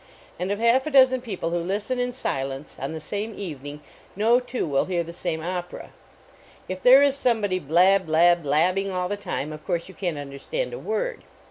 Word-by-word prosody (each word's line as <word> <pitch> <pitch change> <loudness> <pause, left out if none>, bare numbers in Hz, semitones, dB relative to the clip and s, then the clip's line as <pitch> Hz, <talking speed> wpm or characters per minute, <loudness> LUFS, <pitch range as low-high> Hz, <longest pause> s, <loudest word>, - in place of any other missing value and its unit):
And 180 +1 -2
of 205 - 0
half 235 +5 +3
a - - 0
dozen 260 -3 +5
people 195 -8 -4
who 175 - 0
listen 205 +8 -2
in 245 0 0
silence, 135 - -4
on 135 +3 -4
the 160 - -5
same 205 +7 -4
evening, 145 -5 -7 0.3
no 225 +5 +4
two 250 0 -3
will 140 -4 +1
hear 175 -2 -1
the 170 +1 -9
same 170 -2 -3
opera. 180 0 -5 0.8
If 185 0 -5
there 265 +3 +8
is 280 -1 +3
somebody 220 -8 +1
blab, 180 +4 +3
blab, 170 +2 +4
blabbing 180 +7 +1
all 180 -1 -2
the 205 - -2
time, 155 -7 -4
of 155 - -10
course 170 -3 -2
you 190 - -12
can 175 -5 -3
t - - -6
un 140 -1 -9
derstand 485 - -4
a 485 - -5
word. 470 +2 -3
185 Hz, 210 wpm, -24 LUFS, 165-240 Hz, 0.8 s, there